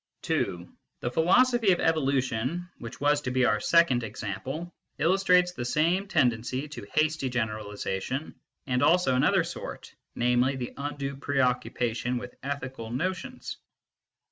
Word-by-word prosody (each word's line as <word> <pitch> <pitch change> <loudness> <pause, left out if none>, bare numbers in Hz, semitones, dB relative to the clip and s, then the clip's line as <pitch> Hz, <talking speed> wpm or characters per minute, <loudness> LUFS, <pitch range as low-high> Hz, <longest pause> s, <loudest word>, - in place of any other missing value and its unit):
(2) 90 0 -1 0.3
The 120 - -2
philosophy 225 - +4
of 175 - +2
evolution, 140 +1 0
which 115 0 -8
was 145 0 +3
to 130 - -3
be 130 0 +2
our 105 - +2
second 170 -6 +4
example, 115 - -5 0.2
illustrates 180 +1 +4
the 145 -9 -5
same 170 +10 +1
tendency 130 -3 +1
to 145 -9 -8
hasty 155 -3 +2
generalisation, 110 +2 -3 0.3
and 125 -2 0
also 155 -2 +4
another 150 +8 +3
sort, 170 - -7 0.2
namely, 125 +2 +2
the 125 -2 -5
undue 140 -1 -4
preoccupation 125 -3 0
with 125 0 -7
ethical 130 -4 -5
notions. 185 - -4
135 Hz, 125 wpm, -28 LUFS, 120-165 Hz, 0.3 s, philosophy